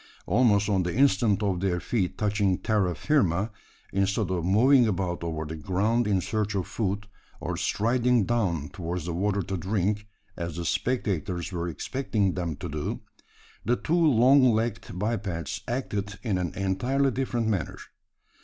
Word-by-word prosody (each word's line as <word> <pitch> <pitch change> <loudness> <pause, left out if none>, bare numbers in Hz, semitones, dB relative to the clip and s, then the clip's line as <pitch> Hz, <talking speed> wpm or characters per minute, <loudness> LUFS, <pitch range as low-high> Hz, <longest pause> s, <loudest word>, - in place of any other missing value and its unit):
Almost 105 -1 +3
on 100 -3 +2
the 90 0 -2
instant 110 -5 +3
of 95 -3 0
their 90 -2 0
feet 95 -2 -1
touching 100 -3 +1
terra 100 -5 0
firma, 105 - +1 0.4
instead 100 0 +1
of 90 -3 -1
moving 120 +7 +5
about 90 -4 -2
over 80 -1 -3
the 80 +1 -5
ground 105 +8 0
in 100 -3 +2
search 105 +1 -2
of 95 -3 0
food, 105 -1 -2 0.3
or - - -3
striding 120 0 +2
down 90 -11 0
towards 85 -2 -4
the 85 - -3
water 100 +3 0
to 95 - -3
drink 100 +3 -1 0.3
as 85 -2 -4
the 85 0 -4
spectators 95 -6 -1
were 85 -1 -3
expecting 105 - -1
them 85 -4 -3
to - - -6
do 75 0 -4 0.6
the 120 +4 +2
two 155 - -3
long 140 -5 +5
legged 110 -4 -2
bipeds 95 -6 -2
acted 105 -5 -3
in 105 -6 0
an 90 -3 -3
entirely 125 +9 +1
different 120 -2 -1
manner. 95 - -1
100 Hz, 155 wpm, -27 LUFS, 90-115 Hz, 0.6 s, moving